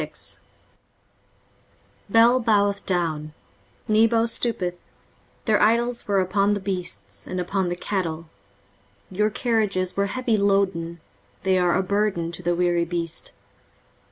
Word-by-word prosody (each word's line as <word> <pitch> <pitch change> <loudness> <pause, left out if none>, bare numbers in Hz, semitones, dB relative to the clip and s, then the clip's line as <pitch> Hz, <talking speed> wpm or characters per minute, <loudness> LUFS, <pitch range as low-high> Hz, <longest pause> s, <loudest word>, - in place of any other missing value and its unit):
23:046:001 - - -5 1.7
Bel 230 +4 +5
boweth 205 -4 +2
down, 160 -4 -1 0.5
Nebo 225 +1 +4
stoopeth, 205 -7 -1 0.7
their 215 -2 +3
idols 235 +3 +2
were 200 -1 +2
upon 195 +2 +2
the - - -2
beasts, 185 -2 -5
and 185 - -3
upon 180 +1 -1
the 175 - -2
cattle: 170 -4 -3 0.8
your 210 +3 +1
carriages 210 -5 0
were 200 0 +1
heavy 235 +1 0
loaden; 190 -4 +1 0.4
they 190 -1 +3
are 175 -1 +2
a 190 - +1
burden 195 -4 0
to 170 - -7
the 175 0 0
weary 175 -1 +2
beast. 170 -1 -3
195 Hz, 125 wpm, -24 LUFS, 175-215 Hz, 1.7 s, Bel